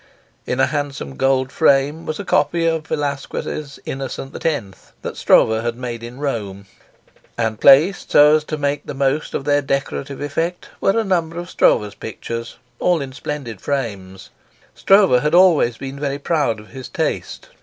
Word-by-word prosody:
In 125 Hz, -, -2 dB
a -, -, +5 dB
handsome 140 Hz, -, -4 dB
gold 135 Hz, -, +1 dB
frame 145 Hz, +2 st, +2 dB
was 155 Hz, -, -3 dB
a -, -, -5 dB
copy 165 Hz, +3 st, +1 dB
of 160 Hz, -1 st, 0 dB
Velasquez' 145 Hz, 0 st, -4 dB
Innocent 135 Hz, 0 st, -6 dB
X., 130 Hz, -12 st, -3 dB
that -, -, -5 dB
Stroeve 110 Hz, 0 st, +4 dB
had 120 Hz, 0 st, -2 dB
made 120 Hz, -2 st, -5 dB
in 120 Hz, +2 st, -9 dB
Rome, 105 Hz, -9 st, -4 dB, 0.7 s
and 110 Hz, -2 st, -2 dB
placed 150 Hz, +8 st, +5 dB
so 150 Hz, +1 st, +7 dB
as 155 Hz, -, -5 dB
to 155 Hz, -, -4 dB
make 145 Hz, 0 st, -1 dB
the -, -, -5 dB
most 140 Hz, +2 st, 0 dB
of 135 Hz, -, -3 dB
their 145 Hz, 0 st, +3 dB
decorative 140 Hz, 0 st, -3 dB
effect 165 Hz, +5 st, -3 dB
were 195 Hz, -, +2 dB
a -, -, +1 dB
number 170 Hz, -4 st, -1 dB
of 175 Hz, +1 st, -6 dB
Stroeve's 105 Hz, -1 st, +2 dB
pictures, 115 Hz, +1 st, -7 dB, 0.2 s
all 180 Hz, -2 st, +2 dB
in 135 Hz, -2 st, -6 dB
splendid 130 Hz, -7 st, -6 dB
frames. 100 Hz, -9 st, -4 dB, 0.4 s
Stroeve 195 Hz, -11 st, +4 dB
had 150 Hz, +2 st, +1 dB
always 165 Hz, -10 st, +5 dB
been 135 Hz, +1 st, -7 dB
very 140 Hz, -1 st, -2 dB
proud 145 Hz, -7 st, 0 dB
of 105 Hz, -, -14 dB
his 130 Hz, -2 st, -9 dB
taste. -, -, -3 dB
140 Hz, 165 wpm, -20 LUFS, 120-155 Hz, 0.7 s, so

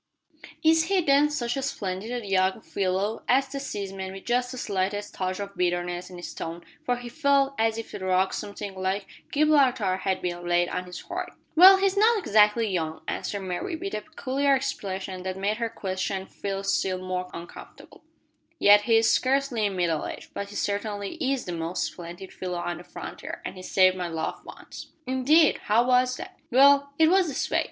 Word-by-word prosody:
"Is 320 Hz, 0 st, +5 dB
he, 390 Hz, +1 st, +2 dB
then, 290 Hz, -1 st, +4 dB
such 245 Hz, -5 st, -2 dB
a 270 Hz, -, -2 dB
splendid 220 Hz, -1 st, -4 dB
young 190 Hz, +1 st, +1 dB
fellow!" 195 Hz, +3 st, -1 dB
asked 265 Hz, +1 st, +3 dB
the 275 Hz, -, -4 dB
seaman, 195 Hz, -7 st, -5 dB
with 195 Hz, -, -10 dB
just 245 Hz, +1 st, 0 dB
the 255 Hz, -, -7 dB
slightest 205 Hz, -1 st, -2 dB
touch 185 Hz, 0 st, -3 dB
of 200 Hz, 0 st, -6 dB
bitterness 175 Hz, 0 st, -1 dB
in 180 Hz, -, -10 dB
his 175 Hz, -, -7 dB
tone, 170 Hz, +1 st, -6 dB, 0.2 s
for 245 Hz, -, +1 dB
he 245 Hz, 0 st, -8 dB
felt 280 Hz, 0 st, +2 dB
as 225 Hz, 0 st, +2 dB
if 225 Hz, -, -7 dB
a -, -, -5 dB
rock 185 Hz, 0 st, +1 dB
something 200 Hz, -1 st, -5 dB
like 190 Hz, +1 st, -2 dB, 0.3 s
Gibraltar 265 Hz, -10 st, +3 dB
had 190 Hz, 0 st, -2 dB
been 175 Hz, -1 st, -3 dB
laid 175 Hz, 0 st, +2 dB
on 180 Hz, -, -3 dB
his 180 Hz, 0 st, -8 dB
heart. -, -, -5 dB, 0.2 s
"Well, 375 Hz, +4 st, +10 dB
he's 390 Hz, 0 st, +1 dB
not 440 Hz, +3 st, +4 dB
exactly 220 Hz, -, +3 dB
young," 160 Hz, -5 st, -3 dB
answered 200 Hz, -, -3 dB
Mary, 190 Hz, -, -3 dB
with 385 Hz, +5 st, -5 dB
a 215 Hz, -, -2 dB
peculiar 280 Hz, -1 st, 0 dB
expression 190 Hz, -7 st, -4 dB
that 185 Hz, 0 st, -4 dB
made 205 Hz, +3 st, -1 dB
her 230 Hz, -1 st, -1 dB
questioner 190 Hz, -2 st, -3 dB
feel 195 Hz, 0 st, -5 dB
still 190 Hz, -1 st, 0 dB
more 185 Hz, 0 st, -4 dB
uncomfortable, 170 Hz, +1 st, -11 dB, 0.5 s
"yet 205 Hz, 0 st, +7 dB
he 225 Hz, +1 st, +3 dB
is 225 Hz, 0 st, +4 dB
scarcely 260 Hz, -5 st, +1 dB
middle 175 Hz, -5 st, -1 dB
aged, -, -, -9 dB
but 200 Hz, 0 st, -5 dB
he 205 Hz, -, -11 dB
certainly 205 Hz, 0 st, -2 dB
is 270 Hz, -1 st, 0 dB
the 180 Hz, -, -4 dB
most 165 Hz, +1 st, -2 dB
splendid 175 Hz, +2 st, -7 dB
fellow 180 Hz, -1 st, -4 dB
on 175 Hz, -1 st, -3 dB
the -, -, -10 dB
frontier; -, -, -8 dB
and -, -, -5 dB
he 185 Hz, -, -9 dB
saved 185 Hz, 0 st, +4 dB
my 180 Hz, -1 st, -3 dB
life 160 Hz, -1 st, -4 dB
once." -, -, -11 dB, 0.2 s
"Indeed! 265 Hz, +5 st, +4 dB
how 225 Hz, +4 st, +3 dB
was 250 Hz, 0 st, +3 dB
that?" -, -, -9 dB
"Well, 280 Hz, +2 st, +5 dB
it 320 Hz, -, +5 dB
was 375 Hz, 0 st, +4 dB
this 285 Hz, -3 st, -3 dB
way. -, -, +3 dB
205 Hz, 190 wpm, -26 LUFS, 185-260 Hz, 0.5 s, Well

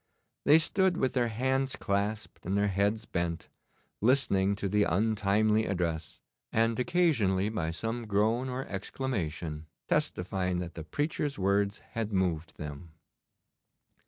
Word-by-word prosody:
They 150 Hz, -, +8 dB
stood 190 Hz, +2 st, +2 dB
with 130 Hz, -, +1 dB
their 125 Hz, -2 st, +2 dB
hands 130 Hz, +4 st, 0 dB
clasped 105 Hz, +2 st, -2 dB
and 95 Hz, +3 st, 0 dB
their 100 Hz, 0 st, +2 dB
heads 100 Hz, +3 st, +1 dB
bent, 85 Hz, -3 st, -3 dB, 0.5 s
listening 105 Hz, -5 st, +3 dB
to 100 Hz, -, -2 dB
the 105 Hz, +2 st, +2 dB
untimely 105 Hz, +2 st, +2 dB
address, 85 Hz, -4 st, -2 dB, 0.3 s
and 115 Hz, +1 st, +2 dB
occasionally 125 Hz, -, +2 dB
by 90 Hz, -8 st, -2 dB
some 115 Hz, +7 st, -3 dB
groan 110 Hz, +5 st, +1 dB
or 130 Hz, +1 st, -4 dB
exclamation 85 Hz, -, -3 dB, 0.2 s
testifying 90 Hz, 0 st, 0 dB
that 90 Hz, -1 st, -4 dB
the 80 Hz, -, -6 dB
preacher's 145 Hz, -, -2 dB
words 100 Hz, +1 st, +1 dB
had 115 Hz, -2 st, -2 dB
moved 90 Hz, -4 st, -1 dB
them. 75 Hz, +2 st, -8 dB
100 Hz, 130 wpm, -30 LUFS, 90-120 Hz, 0.5 s, They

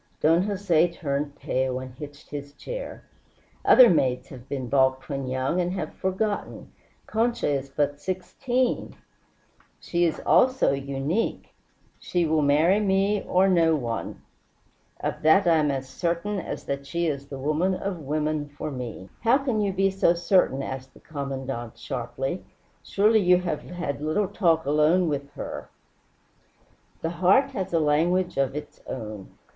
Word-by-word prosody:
Don 165 Hz, +3 st, +4 dB
Jose 185 Hz, -4 st, +2 dB
turned 145 Hz, -3 st, -3 dB
pale 130 Hz, 0 st, -1 dB
and 130 Hz, -1 st, -8 dB
hitched 145 Hz, +2 st, -11 dB
his 145 Hz, -1 st, -6 dB
chair. -, -, -7 dB, 0.6 s
"Other 255 Hz, -2 st, +8 dB
maids 130 Hz, -, +1 dB
have 130 Hz, -1 st, -12 dB
been 130 Hz, -3 st, -3 dB
balked 130 Hz, 0 st, +2 dB
when 135 Hz, -2 st, -3 dB
young, 130 Hz, +7 st, 0 dB
and 175 Hz, +1 st, -1 dB
have 170 Hz, -5 st, -4 dB
forgotten. 200 Hz, +2 st, -3 dB, 0.3 s
Concha 235 Hz, +2 st, 0 dB
is 140 Hz, -2 st, -1 dB
but 145 Hz, +1 st, -1 dB
sixteen 240 Hz, -, -2 dB, 0.4 s
" -, -, -36 dB
"She 175 Hz, 0 st, 0 dB
is 165 Hz, -, -1 dB
also 255 Hz, -, +4 dB
unique. 140 Hz, +9 st, -2 dB, 0.5 s
She 175 Hz, -2 st, 0 dB
will 155 Hz, -1 st, +2 dB
marry 155 Hz, +7 st, +4 dB
me 200 Hz, 0 st, +2 dB
or 185 Hz, +2 st, +4 dB
no 165 Hz, -4 st, +4 dB
one. 120 Hz, -5 st, -4 dB, 0.8 s
Of -, -, -3 dB
that 160 Hz, +6 st, +5 dB
I 170 Hz, -2 st, +5 dB
am 150 Hz, -1 st, +2 dB
as 135 Hz, -1 st, -2 dB
certain 175 Hz, +8 st, -2 dB
as -, -, -5 dB
that 140 Hz, 0 st, -4 dB
she 170 Hz, +4 st, -1 dB
is 140 Hz, -3 st, -2 dB
the 135 Hz, -, -7 dB
woman 155 Hz, +7 st, 0 dB
of 185 Hz, -1 st, -4 dB
women 150 Hz, 0 st, -2 dB
for 145 Hz, +1 st, -6 dB
me." 120 Hz, -7 st, -6 dB
"How 240 Hz, +3 st, +4 dB
can 255 Hz, -6 st, -1 dB
you 200 Hz, -1 st, +1 dB
be 195 Hz, +1 st, +2 dB
so 190 Hz, -3 st, +3 dB
certain?" 170 Hz, -6 st, +2 dB
asked 130 Hz, -1 st, -7 dB
the -, -, -15 dB
Commandante 135 Hz, -5 st, -5 dB
sharply. 135 Hz, +6 st, -4 dB, 0.4 s
"Surely 215 Hz, +2 st, +3 dB
you 180 Hz, -2 st, +5 dB
have 160 Hz, -5 st, -2 dB
had 170 Hz, -5 st, -5 dB
little 155 Hz, +7 st, 0 dB
talk 170 Hz, -6 st, +2 dB
alone 155 Hz, +5 st, +3 dB
with 140 Hz, -2 st, -2 dB
her?" 145 Hz, -, -7 dB, 1.3 s
"The 165 Hz, -, -1 dB
heart 190 Hz, +11 st, +3 dB
has 190 Hz, -3 st, -4 dB
a 165 Hz, -, +2 dB
language 170 Hz, +5 st, +1 dB
of 135 Hz, 0 st, +1 dB
its 150 Hz, 0 st, -7 dB
own. 105 Hz, -5 st, -7 dB
155 Hz, 155 wpm, -25 LUFS, 140-185 Hz, 1.3 s, Other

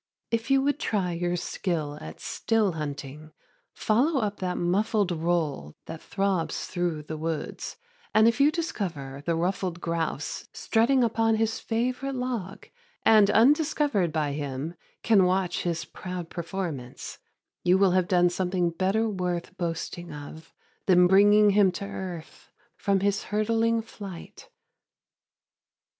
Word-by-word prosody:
If 230 Hz, +2 st, -1 dB
you 270 Hz, 0 st, +4 dB
would 285 Hz, +1 st, +1 dB
try 190 Hz, -5 st, 0 dB
your 175 Hz, +1 st, -1 dB
skill 160 Hz, -4 st, -3 dB
at 80 Hz, 0 st, -9 dB
still 220 Hz, -4 st, 0 dB
hunting, 150 Hz, -1 st, -6 dB, 0.4 s
follow 265 Hz, +7 st, +1 dB
up 210 Hz, -3 st, -2 dB
that 180 Hz, -1 st, -2 dB
muffled 200 Hz, +2 st, +1 dB
roll 160 Hz, -, -1 dB
that 160 Hz, 0 st, -8 dB
throbs 195 Hz, -4 st, -1 dB
through 175 Hz, -4 st, -2 dB
the 155 Hz, +1 st, -6 dB
woods, 160 Hz, -1 st, -4 dB, 0.3 s
and 220 Hz, +1 st, +5 dB
if 230 Hz, +4 st, +2 dB
you 285 Hz, -, +6 dB
discover 170 Hz, -, -4 dB
the 170 Hz, +2 st, 0 dB
ruffed 180 Hz, +1 st, -1 dB
grouse 165 Hz, -4 st, -3 dB
strutting 245 Hz, +3 st, +2 dB
upon 225 Hz, -1 st, +2 dB
his 220 Hz, 0 st, 0 dB
favorite 255 Hz, +4 st, -2 dB
log, 240 Hz, -7 st, -4 dB, 0.4 s
and 215 Hz, -2 st, +6 dB
undiscovered 285 Hz, -, +3 dB
by 150 Hz, -2 st, 0 dB
him 140 Hz, +2 st, -4 dB, 0.3 s
can 215 Hz, -4 st, +5 dB
watch 185 Hz, 0 st, +1 dB
his 170 Hz, -2 st, -2 dB
proud 180 Hz, -2 st, -7 dB
performance, 170 Hz, -8 st, -5 dB, 0.4 s
you 180 Hz, +1 st, +4 dB
will 195 Hz, -1 st, +4 dB
have 185 Hz, -1 st, +2 dB
done 175 Hz, -1 st, +3 dB
something 180 Hz, -1 st, 0 dB
better 195 Hz, +6 st, +1 dB
worth 180 Hz, -3 st, -3 dB
boasting 170 Hz, 0 st, -4 dB
of 150 Hz, +2 st, -10 dB, 0.4 s
than 180 Hz, -2 st, +6 dB
bringing 205 Hz, +3 st, +6 dB
him 200 Hz, -2 st, +4 dB
to 200 Hz, -, -5 dB
earth 180 Hz, -5 st, -7 dB, 0.3 s
from 195 Hz, -2 st, +1 dB
his 200 Hz, 0 st, 0 dB
hurtling 225 Hz, +2 st, +1 dB
flight. 200 Hz, -5 st, -10 dB
185 Hz, 135 wpm, -27 LUFS, 165-220 Hz, 0.4 s, you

